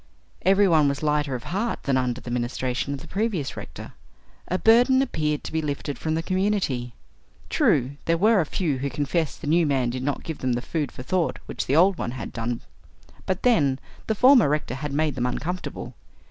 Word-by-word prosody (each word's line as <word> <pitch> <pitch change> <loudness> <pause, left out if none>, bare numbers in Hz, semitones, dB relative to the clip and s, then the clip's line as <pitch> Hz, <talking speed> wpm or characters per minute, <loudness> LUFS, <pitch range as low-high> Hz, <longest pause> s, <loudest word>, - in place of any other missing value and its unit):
Every 195 +2 +4
one 155 -4 +4
was 140 +2 -3
lighter 150 -3 +1
of 120 - -6
heart 210 +6 -2
than 135 - +1
under 125 -1 0
the 120 - -8
ministration 125 +2 -2
of 135 - -9
the - - -11
previous 195 -8 -2
rector. 70 - -9 0.5
A 185 - 0
burden 245 +5 +5
appeared 155 - -1
to - - -6
be 160 - 0
lifted 145 -1 -4
from 155 0 -1
the 165 - -1
community. 185 - -1 0.6
True, 135 +1 +2
there 165 0 +2
were 210 +2 +4
a - - -1
few 150 -7 -1
who 140 +2 -2
confessed 145 +4 -2
the 155 - -6
new 165 +1 +3
man 130 -4 +1
did 130 +1 -4
not 140 +2 -2
give 160 -3 -5
them 130 -1 0
the 120 - -1
food 150 -4 -2
for 125 - -9
thought 175 +4 0
which - - -4
the 135 - +2
old 180 +3 +4
one - - -2
had - - -6
done, 115 0 -3 0.7
but, 190 -1 -1
then, 145 - +3 0.3
the 220 - +1
former 250 - +6
rector 150 -4 -1
had 140 +2 -4
made 150 +1 +1
them 125 -1 -1
uncomfortable! 180 +8 -4
150 Hz, 205 wpm, -25 LUFS, 130-185 Hz, 0.7 s, former